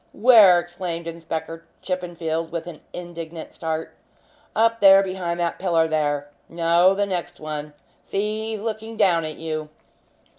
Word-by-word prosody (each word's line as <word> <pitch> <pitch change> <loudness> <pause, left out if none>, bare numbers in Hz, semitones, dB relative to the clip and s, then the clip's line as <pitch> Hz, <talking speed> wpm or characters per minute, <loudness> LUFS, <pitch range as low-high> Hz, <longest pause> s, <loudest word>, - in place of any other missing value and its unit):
"Where?" 210 -6 +7
exclaimed 175 -1 -5
Inspector 165 0 -5 0.2
Chippenfield, 170 -3 -3
with 170 -1 -4
an 175 -3 -9
indignant 170 -2 -8
start. 160 -1 -4 0.6
"Up 230 +1 +3
there 195 -1 +8
behind 185 -2 -3
that 170 -1 -1
pillar 170 -3 +2
there 145 -2 -1 0.2
no, 170 +3 +3
the 205 +1 +1
next 180 -3 -4
one. 150 -1 -5 0.3
See, 215 +2 -3
he's 220 -2 -4
looking 220 0 -5
down 170 -5 +3
at 155 -1 -5
you." 155 -1 -4
170 Hz, 140 wpm, -23 LUFS, 160-195 Hz, 0.6 s, there